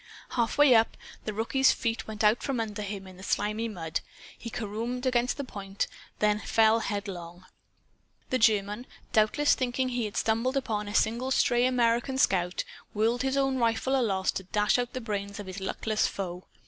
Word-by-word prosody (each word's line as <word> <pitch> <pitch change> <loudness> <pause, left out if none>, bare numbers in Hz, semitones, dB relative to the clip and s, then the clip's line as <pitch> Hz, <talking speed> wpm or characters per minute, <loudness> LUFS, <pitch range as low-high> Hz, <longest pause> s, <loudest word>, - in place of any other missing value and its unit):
Half 235 +1 0
way 290 -3 +7
up, 225 -1 +3 0.3
the 215 - -1
rookie's 235 +5 +3
feet 230 -2 -2
went 220 0 -4
out 215 +3 +4
from 270 -4 -2
under 215 -2 -3
him 200 -1 -5
in 185 -1 -12
the - - -12
slimy 210 +3 0
mud. 165 -6 -3 0.4
He 230 - -8
caromed 230 +3 -4
against 250 -1 +1
the 285 - -3
point, 195 -5 -4 0.3
then 210 0 +2
fell 220 +1 +3
headlong. 185 -5 -5 0.9
The 255 - +2
German, 210 +1 +2 0.3
doubtless 220 +7 +4
thinking 255 0 0
he 245 -2 -1
had 210 - -5
stumbled 230 +5 +1
upon 215 -6 -2
a 205 - -5
single 235 +4 +1
stray 250 -2 +3
American 245 +1 +1
scout, 180 -7 +2 0.3
whirled 230 +3 +2
his 270 +1 0
own 270 -1 +1
rifle 235 +3 +1
aloft, 195 -7 +1
to 190 - -6
dash 210 +5 +2
out 245 -1 -2
the 255 - -4
brains 200 -3 -4
of 205 - -6
his 190 +1 -6
luckless 215 +3 0
foe. 180 -2 -5
220 Hz, 180 wpm, -28 LUFS, 205-245 Hz, 0.9 s, way